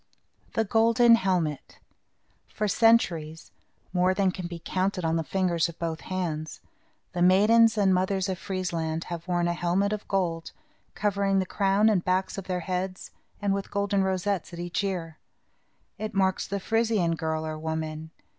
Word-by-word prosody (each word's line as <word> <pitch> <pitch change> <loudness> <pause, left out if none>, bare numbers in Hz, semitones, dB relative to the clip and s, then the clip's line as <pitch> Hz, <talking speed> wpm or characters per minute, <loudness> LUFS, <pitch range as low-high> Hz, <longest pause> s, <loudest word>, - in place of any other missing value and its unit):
THE 225 - +2
GOLDEN 230 +2 +5
HELMET 180 -9 0 0.7
For 210 - -2
centuries, 175 -8 +2 0.4
more 185 +1 +2
than 190 -1 +2
can 180 -2 -6
be 170 -1 -7
counted 185 -1 -1
on 160 0 +1
the 165 - 0
fingers 175 -1 0
of 170 - -11
both 165 -1 -3
hands, 165 -4 -4 0.5
the 175 - -2
maidens 220 +5 +5
and 195 -2 +4
mothers 190 +1 0
of 190 -2 -3
Friesland 170 -4 -3
have 170 +1 -7
worn 175 -1 +1
a 175 - +1
helmet 180 +4 0
of 210 - -5
gold 170 -4 -1 0.4
covering 200 -1 +1
the 190 - +1
crown 200 +3 +2
and 200 -5 +3
back 185 +1 0
of 195 - -6
their 180 -1 -2
heads, 185 +2 -4 0.3
and 200 -1 +2
with 195 0 -3
golden 200 -1 0
rosettes 190 -1 -1
at 170 - -8
each 175 +3 -2
ear. 170 -5 -4 0.8
It 215 -1 -5
marks 190 -1 +1
the 200 - -3
Frisian 220 -5 +1
girl 160 -1 -2
or 155 0 -5
woman. 160 0 -4
185 Hz, 165 wpm, -27 LUFS, 170-200 Hz, 0.8 s, GOLDEN